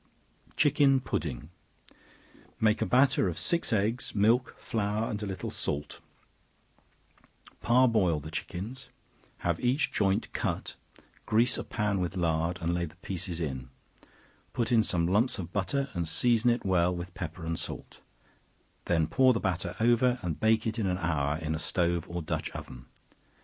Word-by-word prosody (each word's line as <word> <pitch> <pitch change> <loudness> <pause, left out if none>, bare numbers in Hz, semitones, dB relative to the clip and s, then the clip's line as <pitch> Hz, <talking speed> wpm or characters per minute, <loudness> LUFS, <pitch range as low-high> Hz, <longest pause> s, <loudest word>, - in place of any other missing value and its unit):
Chicken 145 -2 +4
Pudding. 75 - -4 1.1
Make 110 -1 +3
a - - +1
batter 130 -5 +4
of 85 - -3
six 170 -1 0
eggs, 110 +4 0
milk, 115 +5 +3
flour 105 0 -1
and 105 -1 -4
a 105 - -3
little 95 -3 -4
salt; 75 +1 -3 1.6
par 125 +2 +5
boil 95 -9 +2
the 75 +2 -9
chickens; 100 +10 -6 0.6
have 85 -1 +1
each 125 +4 +1
joint 100 -2 0
cut, - - -2 0.5
grease 115 +3 +3
a - - -3
pan 105 -3 -1
with 90 +1 -2
lard, 85 0 0
and 85 +1 +1
lay 85 0 0
the 80 - -12
pieces 90 -1 -4
in; 65 -6 -4 0.8
put 120 +1 -1
in 115 -2 +5
some 90 -5 0
lumps 105 +9 +2
of 90 -3 -6
butter, 135 +8 0
and 85 -4 -2
season 115 +8 +3
it 120 -2 0
well 90 -1 +2
with 90 +1 -6
pepper 85 -3 -6
and 80 0 -2
salt; - - -7 0.8
then 80 -2 +2
pour 130 - +4
the 115 - -1
batter 90 -2 -2
over, 120 +2 +3
and 85 -4 -3
bake 110 0 +3
it 110 +1 -2
an 95 -4 0
hour, 80 -5 0
in 80 -1 -3
a 80 - -2
stove 85 -1 0
or 85 -1 -4
dutch 80 -1 -2
oven. 60 -1 -9
95 Hz, 160 wpm, -29 LUFS, 85-115 Hz, 1.6 s, par